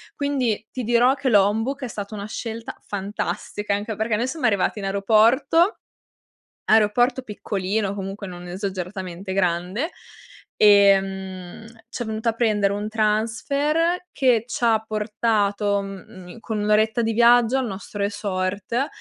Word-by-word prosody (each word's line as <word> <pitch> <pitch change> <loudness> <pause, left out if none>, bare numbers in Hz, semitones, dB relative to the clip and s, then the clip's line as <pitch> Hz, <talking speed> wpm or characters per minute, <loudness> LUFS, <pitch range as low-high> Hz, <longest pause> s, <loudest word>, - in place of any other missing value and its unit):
Quindi 255 -7 -1
ti 255 - -4
dirò 240 +3 +4
che 275 -1 -1
Lombok 225 +7 +2
è 255 - -2
stata 210 -1 -6
una 200 -1 -5
scelta 225 +1 -6
fantastica, 205 0 -3
anche 210 +2 -4
perché 220 +1 0
noi 235 +4 -1
siamo 280 -2 -1
arrivati 205 0 0
in 195 - -5
aeroporto, 225 - +3 0.9
aeroporto 240 +4 +3
piccolino 200 -1 -2
comunque, 195 0 -6
non 180 -1 -9
esageratamente 185 0 -5
grande, 185 - -1 0.6
ehm, 195 -2 +3 0.2
c'è 240 -1 -5
venuta 220 +1 -2
a - - 0
prendere 215 -4 +1
un 205 +1 -3
transfer 280 +11 0
che 245 -5 +2
c'ha 230 -2 +2
portato, 210 -2 0
mhmm, 195 -1 -10
in 230 - -11
con 220 -1 -4
1 210 0 -1
oretta 215 +2 +3
di 225 0 0
viaggio 240 +2 +5
al 260 -3 -1
nostro 200 +1 -7
resort. 200 +5 -2
215 Hz, 135 wpm, -23 LUFS, 200-235 Hz, 0.9 s, viaggio